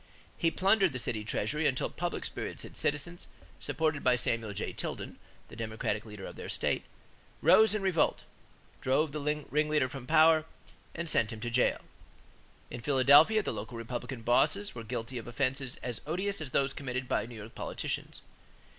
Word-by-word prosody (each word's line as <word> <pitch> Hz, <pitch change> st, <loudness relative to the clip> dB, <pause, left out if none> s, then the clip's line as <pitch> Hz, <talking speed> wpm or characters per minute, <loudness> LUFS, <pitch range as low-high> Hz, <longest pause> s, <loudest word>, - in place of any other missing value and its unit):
He 165 Hz, -, +2 dB
plundered 190 Hz, -1 st, +3 dB
the -, -, -2 dB
city 115 Hz, -3 st, -2 dB
treasury 145 Hz, +8 st, 0 dB
until 130 Hz, -, 0 dB
public 175 Hz, +1 st, -3 dB
spirited -, -, -5 dB
citizens, 160 Hz, +4 st, -2 dB, 0.3 s
supported 155 Hz, -3 st, -1 dB
by 125 Hz, -1 st, +5 dB
Samuel 115 Hz, -3 st, -1 dB
J. 100 Hz, -, -4 dB
Tilden, -, -, -5 dB, 0.3 s
the -, -, -12 dB
Democratic 110 Hz, -1 st, -2 dB
leader 105 Hz, -2 st, -8 dB
of -, -, -9 dB
the -, -, -7 dB
state, -, -, -1 dB, 0.6 s
rose 220 Hz, 0 st, +6 dB
in 210 Hz, -, -2 dB
revolt, 185 Hz, -4 st, +2 dB, 0.6 s
drove 140 Hz, +4 st, +2 dB
the 150 Hz, -, -4 dB
ringleader 150 Hz, -1 st, +1 dB
from 130 Hz, -1 st, -8 dB
power, 155 Hz, 0 st, +6 dB, 0.5 s
and 170 Hz, 0 st, -3 dB
sent 115 Hz, -7 st, +2 dB
him 110 Hz, -, -7 dB
to 120 Hz, +1 st, -3 dB
jail. 125 Hz, +1 st, +2 dB, 0.9 s
In 120 Hz, -, -6 dB
Philadelphia, 145 Hz, -, +6 dB
the -, -, -2 dB
local 110 Hz, +3 st, -6 dB
Republican 120 Hz, +1 st, -5 dB
bosses 150 Hz, -, +2 dB
were 115 Hz, -, -7 dB
guilty 120 Hz, +2 st, -4 dB
of 115 Hz, -, -10 dB
offenses 130 Hz, +2 st, -1 dB
as 120 Hz, -3 st, -4 dB
odious 190 Hz, +4 st, -1 dB
as 155 Hz, -, -5 dB
those 135 Hz, +1 st, +1 dB
committed 130 Hz, -2 st, -4 dB
by 110 Hz, -, 0 dB
New 120 Hz, -, -10 dB
York 110 Hz, +1 st, -9 dB
politicians. -, -, -4 dB
135 Hz, 165 wpm, -31 LUFS, 115-155 Hz, 0.9 s, rose